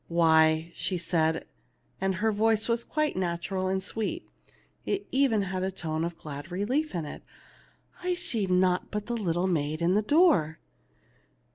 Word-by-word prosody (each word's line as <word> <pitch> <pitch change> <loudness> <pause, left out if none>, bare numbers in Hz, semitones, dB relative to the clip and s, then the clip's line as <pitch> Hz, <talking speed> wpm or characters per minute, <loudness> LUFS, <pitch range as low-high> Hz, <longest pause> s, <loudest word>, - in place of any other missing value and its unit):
" - - -40 0.2
Why," 160 0 +4
she 185 - -2
said, 160 -2 0 0.6
and 190 0 +1
her 220 +4 +1
voice 220 +1 +2
was 235 0 0
quite 305 -1 -1
natural 185 +1 -2
and 190 0 -1
sweet, 225 - -4 0.6
it 395 - -1
had - - -24
even 260 -6 +3
a 190 0 -2
tone 160 -4 -3
of 170 0 -4
glad 145 +3 -8
relief 250 - -1
in 165 -3 -2
it, 145 - -8 0.8
"I 360 0 0
see 230 - -1
naught 180 0 +2
but 210 +2 -4
a - - 0
little 180 -6 0
maid 155 -4 0
in 170 +2 +2
the 210 - +3
door." 210 - +3
185 Hz, 165 wpm, -28 LUFS, 170-225 Hz, 0.8 s, Why